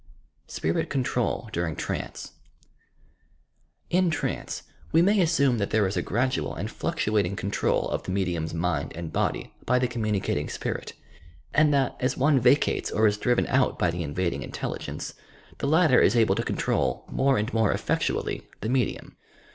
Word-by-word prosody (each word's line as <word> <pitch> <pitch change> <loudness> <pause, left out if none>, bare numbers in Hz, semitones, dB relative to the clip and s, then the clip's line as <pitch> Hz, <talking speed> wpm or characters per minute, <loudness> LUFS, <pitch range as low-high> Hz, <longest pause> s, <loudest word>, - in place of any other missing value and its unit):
SPIMT 80 +1 -1
CONTROL 125 -4 -1
DURING 85 -3 -1
TRANCE - - -5 1.6
In 180 0 +3
trance, 160 - -3 0.3
we - - +5
may 200 +2 +4
assume 140 -8 +3
that 100 - -1
there 105 -1 +2
is 95 - -2
a - - +1
gradual 115 - -1
and - - -4
fluctuating 100 -3 0
control 100 +1 0
of - - -2
the - - -9
medium's 90 -4 -1
mind 85 -3 -1
and 85 -1 -6
body - - -1
by 125 - +2
the 125 0 +2
communicating 110 -5 -1
spirit, - - -4 0.6
and 150 -1 +5
that, 135 -3 +1
as 125 - 0
one 140 0 +4
vacates 125 +4 +3
or 110 - +2
is 105 -1 +2
driven 125 +2 +2
out 130 0 +2
by 90 - +2
the 85 +1 -4
invading 85 -1 -2
intelligence, - - -5 0.5
the - - -1
latter 155 -3 +5
is 100 - +4
able 115 -2 +4
to - - -1
control, - - -1
more 135 0 +2
and 105 +4 -2
more 110 -2 +3
effectually, - - -1
the 110 - -2
medium. 125 -3 -1
115 Hz, 160 wpm, -26 LUFS, 90-135 Hz, 1.6 s, we